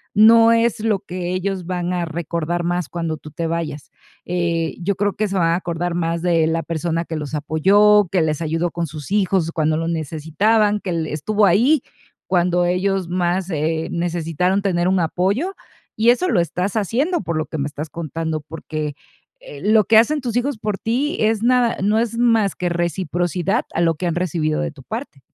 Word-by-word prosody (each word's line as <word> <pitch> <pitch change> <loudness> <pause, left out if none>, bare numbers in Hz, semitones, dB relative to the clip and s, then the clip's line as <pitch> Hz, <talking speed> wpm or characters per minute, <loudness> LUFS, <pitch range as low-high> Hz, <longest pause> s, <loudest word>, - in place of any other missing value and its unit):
no 225 +2 +7
es 230 0 +2
lo 215 -2 +1
que 180 -3 -5
ellos 185 -1 -2
van 180 -1 -2
a 175 -1 -1
recordar 170 +1 -3
más 175 -2 -1
cuando 165 -2 -3
tú 155 - -11
te 165 +3 -4
vayas. 160 -3 -4 0.3
Eh, 170 -2 -1
yo 195 +2 0
creo 205 +1 0
que 215 - -1
se 195 - -4
van 165 -3 +2
a 170 - +2
acordar 175 -1 -2
más 170 0 -1
de 165 -3 +3
la 165 0 0
persona 165 0 -2
que 165 - -5
los 150 0 -5
apoyó, 200 +7 +4
que 185 -3 +2
les 155 0 -1
ayudó 165 +1 -1
con 170 -1 -3
sus 155 +4 -9
hijos 190 -5 +1
cuando 155 -1 0
lo 165 +1 -2
necesitaban, 170 +7 +1
que 185 - -4
le 160 -2 -2
estuvo 205 +7 +1
ahí 240 - +4 0.4
cuando 180 -1 +2
ellos 185 0 0
más, 180 +1 0
eh, 160 +1 -1
necesitaron 175 +2 0
tener 180 -3 +1
un 190 0 +2
apoyo, 195 - 0 0.4
y 225 +2 +3
eso 305 +10 +3
lo 210 - +2
estás 180 +4 -1
haciendo, 265 - 0
por 170 -2 -3
lo 155 - -1
que 160 - -6
me 140 - -1
estás 150 +1 -6
contando, 160 0 -4
porque, 155 -1 -5 0.4
eh, - - -11
lo 215 -1 +4
que 220 +1 +5
hacen 295 +7 +4
tus 245 -4 -4
hijos 250 +1 0
por 210 -2 -3
ti 265 +9 -1
es 220 0 +1
nada 245 -1 +3
no 215 +2 +3
es 230 0 -1
más 225 -4 +2
que 180 - -2
reciprocidad 175 - -1
a 165 - 0
lo 165 -1 +3
que 180 +3 -3
han 170 - -1
recibido 165 -3 -1
de 170 -2 -2
tu 140 -3 -15
parte. 220 - -7
175 Hz, 200 wpm, -20 LUFS, 165-210 Hz, 0.4 s, no